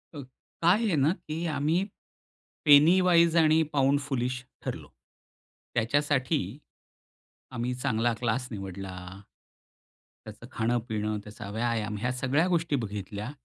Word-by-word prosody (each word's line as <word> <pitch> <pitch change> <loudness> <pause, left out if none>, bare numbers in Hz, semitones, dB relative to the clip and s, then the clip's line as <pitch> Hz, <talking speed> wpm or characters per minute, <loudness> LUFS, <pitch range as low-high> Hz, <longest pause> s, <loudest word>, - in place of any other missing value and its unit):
हं. 145 - -6 0.4
काय 170 +1 +6
आहे 200 -6 +1
ना, 145 +2 +3
की 170 -2 -6
आम्ही 155 +6 +1 0.8
पेनी 150 +5 +7
वाईज 170 -2 +4
आणि 160 0 +5
पाऊंड 140 0 +3
फूलिश 125 -2 -3 0.2
ठरलो. - - -5 0.9
त्याच्यासाठी 140 +4 +1 1.1
आम्ही 120 +1 -2
चांगला 120 -2 0
क्लास 125 +2 -1
निवडला. 95 -2 -6 1.3
त्याचं 110 +2 -11
खाणं-पिणं, 110 -3 -1
त्याचा 105 0 -9
व्यायाम 110 -1 -1
ह्या 125 +4 -1
सगळ्या 135 +6 +1
गोष्टी 170 -4 +1
बघितल्या. 105 -1 -5
125 Hz, 110 wpm, -28 LUFS, 110-155 Hz, 1.3 s, पेनी